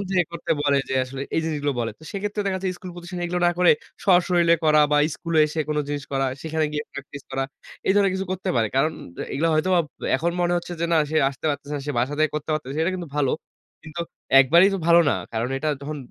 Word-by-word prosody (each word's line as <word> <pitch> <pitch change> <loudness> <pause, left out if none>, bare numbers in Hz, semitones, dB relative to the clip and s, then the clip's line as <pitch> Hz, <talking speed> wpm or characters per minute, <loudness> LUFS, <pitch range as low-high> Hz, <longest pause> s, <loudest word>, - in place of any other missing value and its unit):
Phone - - -2
থেকে 180 -2 +3
করতে 170 - -6
বলে, 140 -1 +3
যে, - - -2
আসলে 135 +1 -8
এই - - +2
জিনিসগুলো 145 -3 -1
বলে। 115 -1 -1
তো - - -21
সেক্ষেত্রে 205 +1 -3
দেখাচ্ছে 190 -1 -1
স্কুল, 185 - -8
পজিশন 175 +1 -7
এগুলো 175 +1 -1
না - - +4
করে, 180 -1 +6 0.3
সশরীলে 175 -2 +4
করা 155 -1 +5
বা - - +5 0.2
স্কুলে 165 -3 0
এসে 155 +1 -3
কোন 150 - -1
জিনিস 145 -1 -3
করা, 135 0 +1 0.2
সেখানে 160 0 -1
গিয়ে 150 0 -2
প্র্যাকটিস 140 0 -8
করা। 135 0 -1 0.4
এ - - 0
ধরনের 200 -2 +3
কিছু 190 0 -3
করতে 185 - -4
পারে। 115 - +3
কারণ 155 +4 +3 0.4
এগুলো 165 +4 +1
হয়তোবা 180 +3 +3 0.4
এখন 170 +5 0
মনে 175 0 +2
হচ্ছে 175 0 -4
যে, 170 - +1
"না, - - +5
সে 160 - 0
আসতে 135 - -15
পারতেছে 145 0 -5
না। - - -4
সে 145 - -1
বাসা 130 +5 0
থেকে 155 0 +3
করতে 150 +1 -4
পারতেছে।" 145 -2 -3
সেটা 165 +3 +2
কিন্তু 175 -3 -5
ভালো। 140 -3 +2 0.5
কিন্তু 160 +2 -7 0.4
একবারেই 170 +9 +6
তো - - -1
ভালো 170 0 +7
না। - - +2 0.2
কারণ 115 +2 -1
এটা 155 +3 -1
যখন 150 +2 -5
160 Hz, 230 wpm, -23 LUFS, 145-175 Hz, 0.5 s, ভালো